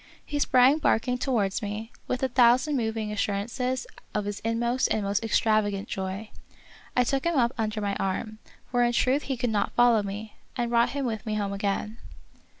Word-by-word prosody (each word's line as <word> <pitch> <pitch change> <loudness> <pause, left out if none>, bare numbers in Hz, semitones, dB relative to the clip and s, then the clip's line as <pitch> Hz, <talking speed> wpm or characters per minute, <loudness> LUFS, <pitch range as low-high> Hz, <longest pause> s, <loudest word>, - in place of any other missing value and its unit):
He 290 - -3
sprang 260 +2 +5
barking 250 -3 +1
towards 225 -6 0
me, 215 +2 -5 0.2
with 255 +1 -2
a - - +4
thousand 255 +4 +4
moving 220 -3 -1
assurances 235 +5 -2 0.3
of 210 -1 0
his 205 0 -4
inmost 235 +3 0
and 215 - 0
most 200 +2 0
ex 225 - +2
travagant 205 -3 +1
joy. 190 +3 -5 0.7
I 250 - +6
took 270 +2 0
him 340 -1 +1
up 240 -2 +3
under 215 -2 -2
my 200 -1 -1
arm, 215 +3 -3 0.3
for 245 -1 +2
in 240 0 +3
truth 260 +4 +2
he 265 - -1
could 245 -1 -1
not 205 -2 0
follow 240 -3 +5
me, 205 +2 -6 0.2
and 240 -1 -1
brought 235 0 +4
him 275 - -1
with 220 -3 -4
me 215 - -1
home 200 -1 -1
again. 205 +3 -2
225 Hz, 190 wpm, -27 LUFS, 210-250 Hz, 0.7 s, I